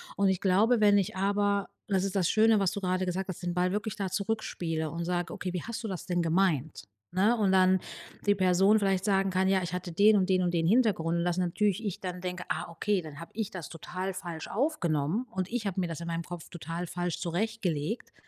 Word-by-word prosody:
Und 200 Hz, -1 st, +3 dB
ich 190 Hz, -, +1 dB
glaube, 215 Hz, +5 st, +3 dB
wenn 205 Hz, -1 st, +5 dB
ich 190 Hz, -1 st, -1 dB
aber- 200 Hz, 0 st, +1 dB, 0.2 s
das 190 Hz, -1 st, +2 dB
ist 195 Hz, 0 st, -3 dB
das 185 Hz, -3 st, +2 dB
Schöne, 220 Hz, -1 st, +4 dB
was 195 Hz, -2 st, +2 dB
du 200 Hz, -, -4 dB
gerade 185 Hz, 0 st, 0 dB
gesagt 185 Hz, +1 st, -2 dB
hast- 185 Hz, -1 st, -6 dB
den 175 Hz, 0 st, -1 dB
Ball 180 Hz, +1 st, +1 dB
wirklich 210 Hz, +1 st, -3 dB
da 195 Hz, -3 st, -1 dB
zurückspiele 180 Hz, -6 st, -2 dB
und 170 Hz, +2 st, -4 dB
sag: 175 Hz, 0 st, -2 dB
„Okay, 185 Hz, -, -4 dB
wie 180 Hz, -, -3 dB
hast 230 Hz, +1 st, -5 dB
du 220 Hz, -, -2 dB
das 185 Hz, -, -5 dB
denn 175 Hz, -1 st, 0 dB
gemeint?”, 165 Hz, -, +1 dB, 0.3 s
ne, 200 Hz, +7 st, +3 dB
und 205 Hz, -4 st, +2 dB
dann 185 Hz, 0 st, +5 dB, 0.5 s
die 205 Hz, -, +5 dB
Person 190 Hz, +2 st, +4 dB
vielleicht 195 Hz, -3 st, +1 dB
sagen 195 Hz, -2 st, +2 dB
kann: 185 Hz, +1 st, +2 dB
„Ja, 190 Hz, -1 st, +2 dB
ich 175 Hz, 0 st, -4 dB
hatte 180 Hz, 0 st, -4 dB
den 205 Hz, +5 st, +5 dB
und 190 Hz, -1 st, +2 dB
den 185 Hz, -1 st, +3 dB
und 175 Hz, 0 st, 0 dB
den 165 Hz, -1 st, +1 dB
Hintergrund”, 190 Hz, -7 st, +2 dB
und 170 Hz, -, 0 dB
dass 175 Hz, 0 st, 0 dB
natürlich 195 Hz, +3 st, 0 dB
ich 205 Hz, -4 st, -3 dB
dann 180 Hz, -1 st, -5 dB
denke: 180 Hz, -1 st, -4 dB
„Ah -, -, -2 dB
okay, 190 Hz, +3 st, 0 dB
dann 150 Hz, -2 st, -10 dB
hab 170 Hz, -, -9 dB
ich 220 Hz, -1 st, -2 dB
das 180 Hz, -4 st, -7 dB
total 185 Hz, +3 st, -5 dB
falsch 175 Hz, -3 st, -6 dB
aufgenommen, 200 Hz, -, 0 dB
und 190 Hz, -2 st, -3 dB
ich 240 Hz, -3 st, -2 dB
hab 195 Hz, -2 st, -2 dB
mir 185 Hz, -2 st, +1 dB
das 165 Hz, -1 st, -5 dB
in -, -, -5 dB
meinem 165 Hz, 0 st, -2 dB
Kopf 175 Hz, -1 st, -8 dB
total 170 Hz, +1 st, -5 dB
falsch 175 Hz, 0 st, -3 dB
zurechtgelegt.” 185 Hz, 0 st, -2 dB
185 Hz, 235 wpm, -29 LUFS, 175-200 Hz, 0.5 s, wenn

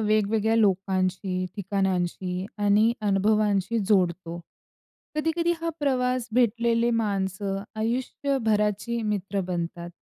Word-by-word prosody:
वेगवेगळ्या 215 Hz, +1 st, +2 dB
लोकांशी, 185 Hz, -2 st, +1 dB
ठिकाणांशी 185 Hz, -2 st, -1 dB
आणि 205 Hz, +2 st, +4 dB
अनुभवांशी 210 Hz, +1 st, +2 dB
जोडतो. 175 Hz, -4 st, +1 dB, 0.8 s
कधी-कधी 325 Hz, +2 st, +1 dB
हा 335 Hz, -, -2 dB
प्रवास, 255 Hz, -3 st, 0 dB
भेटलेले 235 Hz, 0 st, +2 dB
माणसं 195 Hz, -3 st, -1 dB
आयुष्यभराची 230 Hz, -2 st, 0 dB
मित्र 205 Hz, -2 st, -1 dB
बनतात. 170 Hz, -1 st, -4 dB
210 Hz, 85 wpm, -26 LUFS, 190-230 Hz, 0.8 s, आणि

